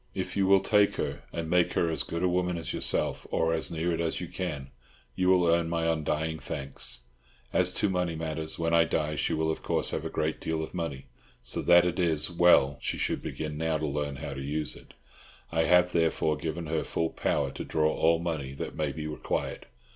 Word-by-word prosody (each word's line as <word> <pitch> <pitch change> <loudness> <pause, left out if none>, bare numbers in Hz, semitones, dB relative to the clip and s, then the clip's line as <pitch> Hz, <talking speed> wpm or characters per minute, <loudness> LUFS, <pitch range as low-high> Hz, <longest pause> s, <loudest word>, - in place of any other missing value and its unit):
If - - -3
you 95 -1 +2
will 95 0 +6
take 105 0 +3
her, - - -3
and 85 -1 -4
make 90 +1 +2
her 85 - +1
as 80 - 0
good 85 +1 -3
a - - +4
woman 90 0 0
as 80 - -4
yourself, - - 0
or 80 0 +1
as 80 - 0
near 85 +1 -1
it 85 0 -1
as 85 - -1
you - - -5
can, 75 -7 -5 0.4
you 90 +8 0
will 90 -2 +5
earn 85 0 +3
my 85 -1 0
undying 80 0 0
thanks. 60 -3 -5 0.5
As - - +4
to 105 - +1
money 90 -3 -1
matters, 80 -1 -3
when 85 0 0
I 85 0 +6
die 75 -2 -1
she 75 - 0
will 80 0 +1
of - - -5
course - - 0
have - - -2
a - - -3
great 80 0 -2
deal 80 -1 -1
of - - -8
money, 80 -7 -4 0.4
so - - +1
that 85 0 +6
it 90 +1 -1
is 80 -2 +1
well 85 -5 +5
she - - -2
should - - -1
begin 75 -1 -5
now 80 -1 +1
to 80 - -2
learn 70 -1 -2
how 70 +1 -5
to 70 - -6
use 75 +2 -2
it; - - -15 0.6
I 80 0 +2
have, 90 0 +5
therefore, 80 -2 +2
given 80 +2 -4
her 80 0 -1
full 80 0 -1
power 70 -2 0
to - - -6
draw 80 -1 +1
all 85 +1 +3
money 80 -5 -3
that - - -5
may 75 -2 -1
be 75 +1 -6
required. 75 0 -3
80 Hz, 225 wpm, -28 LUFS, 75-85 Hz, 0.6 s, will